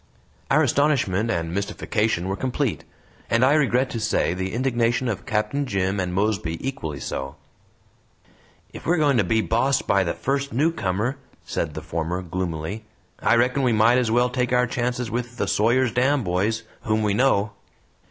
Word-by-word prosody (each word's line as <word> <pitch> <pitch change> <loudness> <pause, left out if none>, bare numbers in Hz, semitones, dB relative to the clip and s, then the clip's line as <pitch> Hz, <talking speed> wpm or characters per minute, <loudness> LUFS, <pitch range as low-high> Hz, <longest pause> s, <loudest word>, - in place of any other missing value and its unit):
Our 155 +3 +4
astonishment 130 -7 +1
and 85 -5 -2
mystification 100 -1 -1
were 95 - -1
complete; 130 +1 -2 0.4
and 115 +2 +4
I 135 - +4
regret 130 -3 +2
to 115 - -3
say, 110 -5 +1
the 95 +1 -3
indignation 120 0 0
of 110 -5 -4
Captain 110 +6 -1
Jim 95 -2 -1
and 90 -1 -1
Mosby 95 -4 -1
equally 80 - -4
so. 65 +1 -5 1.4
"If - - -9
we're 175 +2 +3
going 145 -4 +3
to 110 - +4
be 110 +5 +1
bossed 120 +4 +1
by 100 -1 +3
the 85 - -2
first 140 +1 -2
newcomer," 125 - 0 0.3
said - - -3
the - - -6
former, 85 +3 -3
gloomily, 90 +3 -4 0.4
"I - - +3
reckon 125 +3 +2
we 125 -3 +2
might 115 +3 +4
as 120 -3 0
well 120 +2 +2
take 125 -1 -1
our 125 0 +3
chances 125 -1 -2
with 120 +1 -4
the - - -1
Sawyer's 120 +3 +2
Dam 130 +3 +2
boys, 100 +5 0 0.2
whom 110 0 0
we 105 -1 +1
know." 105 -3 +2
115 Hz, 170 wpm, -23 LUFS, 95-130 Hz, 1.4 s, Our